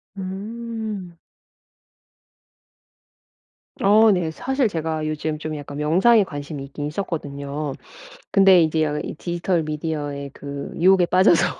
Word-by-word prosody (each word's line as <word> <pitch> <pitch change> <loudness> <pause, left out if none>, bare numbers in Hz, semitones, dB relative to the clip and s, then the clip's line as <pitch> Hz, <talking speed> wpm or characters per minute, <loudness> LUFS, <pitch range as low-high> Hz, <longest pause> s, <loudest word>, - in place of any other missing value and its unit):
음. 205 -1 -6 2.7
어 215 +3 +6
네. 175 -4 0
사실 265 - 0
제가 160 -4 -2
요즘 155 0 -2
좀 155 0 -5
약간 145 -1 -7
명상에 190 +9 +4
관심이 145 -3 -6
있기는 145 +1 -5
있었거든요. 145 -4 -4 0.6
근데 195 -3 +6
이제 155 -2 0
이 - - -6
디지털 175 +1 -1
미디어의 150 -2 -4
그 140 0 -7
유혹에 185 +1 +5
빠져서 180 -1 +4
160 Hz, 235 characters per minute, -22 LUFS, 150-195 Hz, 2.7 s, 어